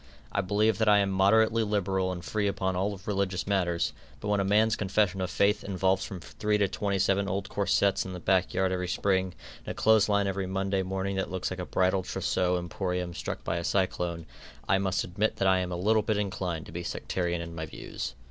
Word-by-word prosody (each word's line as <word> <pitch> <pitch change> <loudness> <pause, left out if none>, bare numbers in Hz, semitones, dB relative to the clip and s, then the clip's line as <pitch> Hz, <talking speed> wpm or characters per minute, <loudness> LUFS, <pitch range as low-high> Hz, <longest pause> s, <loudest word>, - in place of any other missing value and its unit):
I 100 - +1
believe 105 +3 +1
that 110 -1 +3
I 105 - +7
am 100 -1 +2
moderately 110 +4 +4
liberal 95 -3 0
and 90 -1 -6
free 105 -2 0
upon 95 -1 -1
all 100 +1 -1
religious 95 -3 -1
matters, 90 -4 0 0.3
but 105 - -4
when 105 -1 +2
a - - +2
man's 105 +3 +3
confession 100 -1 +1
of 90 - -1
faith 100 +3 +2
involves 95 0 +1
from 95 - -6
three 105 +6 -1
to 100 -1 +2
twenty 100 +1 -1
seven 100 +1 +2
old 100 +1 -2
corsets 100 -1 +2
in 95 - -7
the 90 - -6
back 95 +1 +2
yard 95 -1 +1
every 90 -1 -1
spring, 95 0 0 0.3
and - - -23
a - - -7
clothes 110 -1 +4
line 100 -1 +3
every 95 -1 -2
Monday 95 0 0
morning 95 +1 -2
that 95 - -1
looks 95 0 -3
like 95 - -5
a 90 - -4
bridal 95 +1 +2
trousseau 90 0 0
emporium 90 0 -3
struck - - -5
by 85 - -1
a 85 - -3
cyclone, 90 -3 -1 0.4
I 95 - +3
must 95 -1 0
admit 105 +5 -1
that 95 - +1
I 95 0 +4
am 90 -1 -3
a 90 - -2
little 110 +4 +3
bit 110 0 0
inclined 95 -5 -2
to - - -11
be 85 +2 -4
sectarian 85 0 -2
in 85 0 -6
my 80 -1 -5
views. - - -6
95 Hz, 225 wpm, -28 LUFS, 90-100 Hz, 0.4 s, I